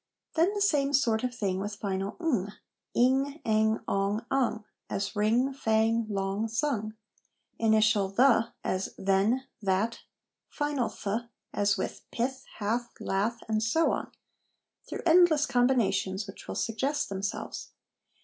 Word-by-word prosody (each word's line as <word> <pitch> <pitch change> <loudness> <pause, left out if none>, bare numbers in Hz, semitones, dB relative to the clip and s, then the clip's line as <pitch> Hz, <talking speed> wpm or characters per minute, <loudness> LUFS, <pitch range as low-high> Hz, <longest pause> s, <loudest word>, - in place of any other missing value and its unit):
Then 335 +4 +3
the 410 - -2
same 290 -8 +2
sort 230 -5 +2
of 250 - 0
thing 200 -6 -2
with 205 +1 -4
final 195 -1 -3
' - - -36
ng 235 - 0 0.2
' - - -60
' - - -58
ing/ 270 +4 +2
' - - -41
ang,' 220 0 +2
'ong,' 200 +3 0
'ung'; 245 -5 0 0.2
as 200 +1 -3
ring, 230 +6 +2
fang, 225 -2 +1
long, 195 +2 -1
sung: 225 -3 -1 0.6
initial 215 -3 +3
'th,' 230 +1 +4
as 185 +1 -2
then, 195 +7 +2 0.2
that', 205 +4 0 0.5
final 290 -6 -1
'th,' 220 +3 -4 0.2
as 205 0 +2
with, - - -4
pith, 260 +3 -2
hath, 235 +3 -1
lath, 210 +5 -1
and 215 -1 0
so 320 +10 +2
on, - - -3 0.8
through - - -5
endless 330 -3 +5
combinations 245 -7 +1
which 195 - -11
will - - -4
suggest 270 +6 -1
themselves. 195 +1 -4
225 Hz, 145 wpm, -29 LUFS, 205-265 Hz, 0.8 s, endless